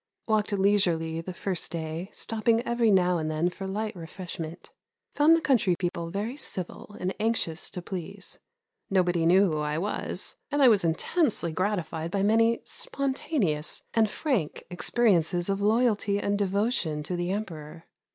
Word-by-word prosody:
Walked 215 -2 +1
leisurely 175 -5 +2
the 185 - -6
first 185 0 -3
day, 165 +2 -4
stopping 225 +1 +1
every 235 -2 +2
now 180 -3 +4
and 155 0 -2
then 160 +3 0
for 195 +1 -6
light 210 +2 -3
refreshment. 170 -1 -7 0.4
Found 310 +3 +6
the 330 - 0
country 230 - +3
people 170 -2 -2
very 205 +7 -3
civil 195 - -5
and 185 +1 -1
anxious 210 -7 -1
to 180 - -7
please. 175 -3 -7 0.5
Nobody 180 -3 +2
knew 185 +1 +5
who 155 - -1
I 150 0 -1
was, 200 +6 -4
and 290 0 0
I 265 -3 +8
was 210 -5 +4
intensely 170 - +1
gratified 170 -3 -2
by 195 +2 0
many 225 +2 +3
spontaneous 260 - -2
and 220 -2 +3
frank 215 - -1
experiences 180 -3 +2
of 195 0 0
loyalty 210 -2 +2
and 200 0 0
devotion 200 -6 0
to 175 +4 -3
the 175 0 -2
Emperor. 165 -6 -5
190 Hz, 150 wpm, -27 LUFS, 170-215 Hz, 0.5 s, I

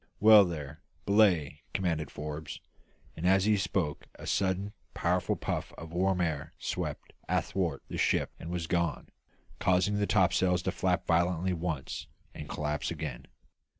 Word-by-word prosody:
"Well 105 -1 +9
there, 75 -4 -6 0.2
belay!" 90 -8 +3
commanded 80 -6 0
Forbes. 75 0 -6 0.6
And 85 +3 -1
as 95 +1 +4
he 105 0 +4
spoke 90 -5 -1
a - - -10
sudden, 95 +1 0 0.2
powerful - - +1
puff - - -3
of 80 0 -10
warm 95 +1 +1
air 80 -5 -2
swept - - -4 0.2
athwart - - 0
the - - -5
ship - - +2
and 80 - -7
was 85 -1 -2
gone, 85 0 -1 0.5
causing 95 +3 +2
the 105 - +1
topsails 90 -2 +3
to 95 - 0
flap 90 +1 0
violently 85 +2 +2
once, 80 -5 -3 0.3
and 75 - -8
collapse 75 -1 -2
again. 75 -6 -5
90 Hz, 145 wpm, -30 LUFS, 80-95 Hz, 0.6 s, Well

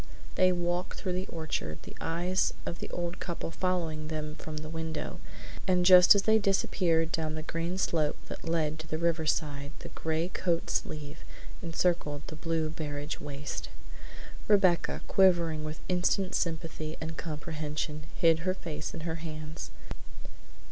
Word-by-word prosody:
They 185 0 +5
walked 175 0 -1
through 185 -3 -2
the 185 +1 -2
orchard, 155 - -3
the - - -10
eyes 175 +3 +1
of 175 - -4
the - - -5
old 175 0 -3
couple 170 -1 -4
following 165 -4 -1
them 155 -1 -3
from 155 0 -7
the 155 0 -5
window, 160 0 -4 0.5
and 180 -1 +3
just 180 +1 +10
as 200 - +3
they 220 +1 +5
disappeared 175 -5 +2
down 155 -2 -1
the 155 - -4
green 165 +3 -2
slope 155 -5 +1
that - - -6
led 155 -2 +1
to 160 - -7
the 155 - -1
riverside 155 -3 0
the - - -8
gray 160 +1 -1
coat 175 -3 0
sleeve 145 -1 -2 0.4
encircled 165 -3 0
the 155 - -7
blue 160 -1 -1
barege 145 -1 -4
waist. 145 -1 -5 0.8
Rebecca, 190 -5 +4
quivering 170 -5 +4
with 155 0 -5
instant 185 +1 +2
sympathy 160 -2 -2
and 160 0 -4
comprehension, 150 -1 -4
hid 165 -2 +5
her 185 +2 0
face 155 -4 -5
in 165 - -5
her 165 0 -2
hands. 155 -1 -6
165 Hz, 150 wpm, -30 LUFS, 155-175 Hz, 0.8 s, just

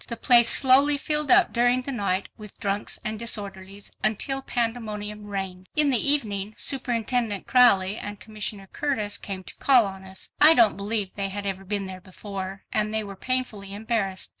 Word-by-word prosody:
The 235 - -4
place 235 -1 +5
slowly 275 +2 +5
filled 300 0 -2
up 370 0 +5
during 245 +1 +2
the 275 - -4
night 200 -5 -2
with 210 -2 -13
drunks 200 -1 -3
and 215 -1 -3
disorderlies 200 -3 -5
until 270 +6 0
pandemonium 215 -4 -4
reigned. 190 -2 -6
In 300 -2 +4
the 260 +3 +4
evening, 210 -7 0
Superintendent 240 -5 -2
Crowley 210 -5 +4
and 205 -1 -7
Commissioner 210 -2 -5
Curtis 215 -9 -2
came 190 -2 -6
to - - -9
call 255 -5 +4
on 190 -1 -8
us. 190 0 -11
I 310 +2 +9
don't 225 -4 +4
believe 200 -1 -2
they 195 -1 -2
had 200 +1 -6
ever 195 -1 -4
been 200 0 -2
there 185 -1 -8
before, 195 0 -8
and 215 0 0
they 220 0 -1
were 200 -1 -9
painfully 210 -4 -3
embarrassed. 205 -3 -3
210 Hz, 175 wpm, -24 LUFS, 195-245 Hz, -, I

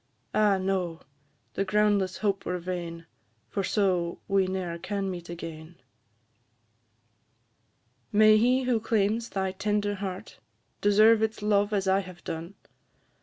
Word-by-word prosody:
Ah, 210 -2 +3
no! 185 -3 -2 0.5
the 195 - 0
groundless 200 -2 +1
hope 200 -2 -1
were 180 - -2
vain, 170 -2 -5 0.5
For 195 - -1
so 180 -4 0
we 195 -1 +2
ne'er 180 -3 -3
can 195 +1 -3
meet 175 -1 -8
again! 165 -1 -8 2.4
May 215 +1 +6
he 250 +4 +3
who 250 -3 +1
claims 220 +1 0
thy 190 -1 -2
tender 205 +1 -1
heart, 190 -2 -6 0.4
Deserve 215 +2 +5
its 220 -1 -1
love 205 0 +2
as 200 -2 0
I 190 +1 +4
have 185 -2 -9
done! 165 +4 -6
195 Hz, 125 wpm, -27 LUFS, 180-210 Hz, 2.4 s, May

